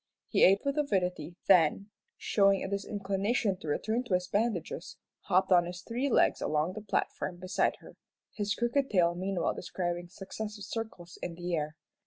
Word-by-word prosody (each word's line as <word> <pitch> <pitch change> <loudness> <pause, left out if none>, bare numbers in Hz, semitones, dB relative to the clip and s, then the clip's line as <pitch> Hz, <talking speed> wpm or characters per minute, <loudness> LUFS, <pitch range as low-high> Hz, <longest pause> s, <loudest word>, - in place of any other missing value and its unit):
He - - +3
ate 195 +5 +5
with 280 +1 0
avidity, 180 - -1
then, 190 +2 +4 0.3
showing 195 -1 +3
a - - -2
disinclination 200 +1 -1
to - - -9
return 220 +11 0
to 195 - +1
his 180 0 -1
bandages, 200 -5 -2 0.3
hopped 190 +1 +2
on 175 -1 +5
his 180 +1 -7
three 250 +4 -1
legs - - +3
along 155 +4 0
the 215 - -6
platform 195 -3 -2
beside 185 +2 0
her, - - -14 0.4
his 205 0 -1
crooked 255 +4 +1
tail 175 -4 +3
meanwhile 185 +1 -1
describing 175 -1 -3
successive 210 +3 -7
circles 205 -7 -6
in 170 - -4
the 175 +1 -4
air. 155 -1 -1
190 Hz, 165 wpm, -30 LUFS, 175-215 Hz, 0.4 s, ate